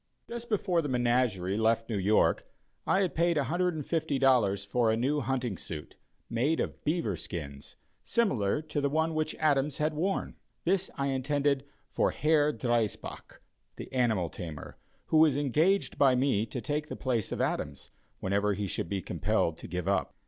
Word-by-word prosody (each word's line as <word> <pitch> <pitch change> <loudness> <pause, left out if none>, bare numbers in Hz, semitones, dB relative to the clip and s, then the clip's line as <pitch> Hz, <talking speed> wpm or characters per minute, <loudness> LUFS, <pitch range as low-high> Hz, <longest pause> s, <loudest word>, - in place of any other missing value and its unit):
Just 235 0 -6
before 185 -5 +1
the 145 - -4
menagerie 120 -6 +1
left 115 +1 +2
New 110 -4 -1
York, 105 +3 +2 0.4
I 195 - +3
had 185 - 0
paid 170 0 +2
$150 140 - +1
for 115 +2 +2
a 110 - +2
new 140 +5 +1
hunting 125 -5 -2
suit, 75 -2 -7 0.3
made 130 +8 +1
of - - -3
beaver 150 - 0
skins, 70 -4 -7 0.3
similar 150 - +1
to 150 -1 -2
the 140 - +1
one 160 +2 +1
which 155 0 -1
Adams 145 -2 +1
had 155 +1 0
worn. 185 +6 -2 0.3
This 190 +2 +1
I 140 0 0
intended 140 +1 0 0.3
for - - +2
Herr 150 -1 +2
Driesbach, 120 -6 -2 0.3
the - - -9
animal 110 -10 +1
tamer, 80 -4 -7 0.3
who 160 - +4
was 155 -3 +5
engaged 155 +8 +1
by 135 -3 +5
me 125 -4 +1
to 125 - -5
take 150 +5 -2
the - - -5
place 120 -6 -1
of - - -3
Adams, 70 0 -2 0.3
whenever 100 +1 +1
he 100 +1 -2
should 85 -3 -3
be 95 -3 -2
compelled 85 -1 0
to - - -8
give 90 +1 -4
up. 100 0 0
130 Hz, 165 wpm, -30 LUFS, 105-155 Hz, 0.4 s, was